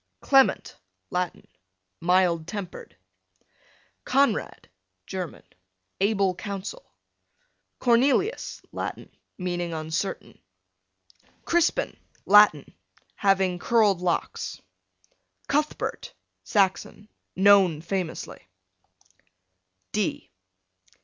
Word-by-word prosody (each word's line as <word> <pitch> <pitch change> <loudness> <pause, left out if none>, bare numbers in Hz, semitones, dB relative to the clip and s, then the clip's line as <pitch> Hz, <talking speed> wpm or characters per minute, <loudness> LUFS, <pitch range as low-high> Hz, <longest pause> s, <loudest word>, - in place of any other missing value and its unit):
Clement, 270 -1 +3 0.3
Latin, 180 -1 -3 0.5
mild 175 -2 +2
tempered. 180 - -7 1.1
Conrad, 270 -4 0 0.4
German, 185 -3 -6 0.6
able 195 -1 +2
counsel. 200 - -7 0.9
Cornelius, 260 - +1
Latin, - - -6 0.2
meaning 175 -2 -3
uncertain. 160 +4 -4 1.0
Crispin, 345 +9 +1 0.3
Latin, 205 -8 +5 0.4
having 190 -3 +1
curled 210 -4 +3
locks. 175 -2 -2 0.9
Cuthbert, 300 +1 -2 0.3
Saxon, 200 0 0 0.3
known 190 -4 +5
famously. 175 -1 -5
195 Hz, 60 wpm, -25 LUFS, 180-220 Hz, 1.1 s, Latin